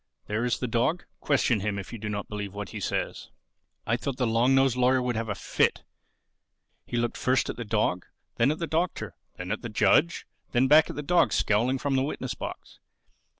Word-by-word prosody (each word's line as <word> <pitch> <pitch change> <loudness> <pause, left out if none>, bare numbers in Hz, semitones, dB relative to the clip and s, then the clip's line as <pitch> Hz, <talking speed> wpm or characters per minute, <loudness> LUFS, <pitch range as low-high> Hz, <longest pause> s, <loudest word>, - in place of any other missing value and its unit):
There 105 +2 -2
is 125 - +1
the - - -3
dog: 120 +10 0 0.2
question 130 -6 +2
him, 100 0 -2
if 100 +3 -7
you 115 - -6
do 105 0 -4
not 100 -1 -4
believe 105 -2 -6
what 105 -1 -5
he - - -6
says." - - -3 0.6
I 115 - +1
thought 125 +1 -4
the 125 - +1
long 120 +3 +3
nosed 135 -2 +3
lawyer 125 +1 +3
would 125 -1 -1
have 115 0 -3
a 100 - -1
fit. - - 0 1.0
He 120 - -3
looked 120 0 -1
first 130 +1 +1
at - - -10
the 120 - -5
dog, 105 -5 0 0.3
then 115 +3 +4
at 155 - 0
the 165 - -2
Doctor, 165 +2 -2 0.2
then 90 0 -5
at 110 - -2
the 115 - -5
judge, 170 +9 +2 0.3
then 125 +1 +4
back 155 +3 +6
at - - -6
the 150 - -4
dog 175 +4 +3
scowling 120 +6 +2
from 140 +1 -1
the 130 - +2
witness 145 - -3
box. - - -8
120 Hz, 215 wpm, -27 LUFS, 105-135 Hz, 1.0 s, back